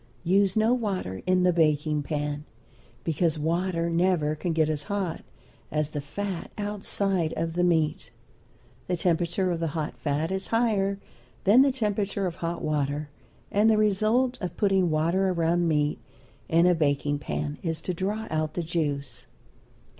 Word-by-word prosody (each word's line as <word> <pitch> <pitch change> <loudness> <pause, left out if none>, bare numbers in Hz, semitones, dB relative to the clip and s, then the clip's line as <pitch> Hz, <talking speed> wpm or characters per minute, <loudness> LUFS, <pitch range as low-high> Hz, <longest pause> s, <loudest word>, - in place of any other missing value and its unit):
Use 195 +2 +3
no 220 +3 +4
water 195 - -2
in 185 0 +3
the 180 -1 +4
baking 150 -2 +2
pan, 145 0 -3 0.6
because 165 0 +1
water 170 +2 0
never 170 -3 +2
can 170 +3 -3
get 160 -1 +2
as 150 -2 -2
hot 195 -5 -2 0.5
as 150 -1 -1
the 150 - -3
fat 185 +5 -5
outside 195 -4 0
of 165 0 -1
the 175 +1 +1
meat. 160 -7 +1 0.8
The 180 - 0
temperature 175 +2 +1
of 170 - -2
the 165 -1 -2
hot 155 -1 -3
fat 150 +3 -1
is 190 0 -2
higher 210 -4 +1 0.5
than 215 +7 +6
the 275 0 +4
temperature 205 -5 -1
of 175 -1 -3
hot 170 -1 -3
water, 145 -1 -1 0.4
and 210 +2 +4
the 220 - +4
result 215 +5 +2
of 180 -3 -4
putting 195 -4 +3
water 170 +5 +2
around 170 0 +1
meat 150 -2 +1 0.5
in 165 +1 +4
a 180 - +5
baking 145 -2 0
pan 145 0 -4
is 165 -3 -2
to 185 - -3
draw 205 +5 -2
out 155 -1 -1
the 175 - -1
juice. 150 -4 -3
170 Hz, 160 wpm, -27 LUFS, 155-195 Hz, 0.8 s, than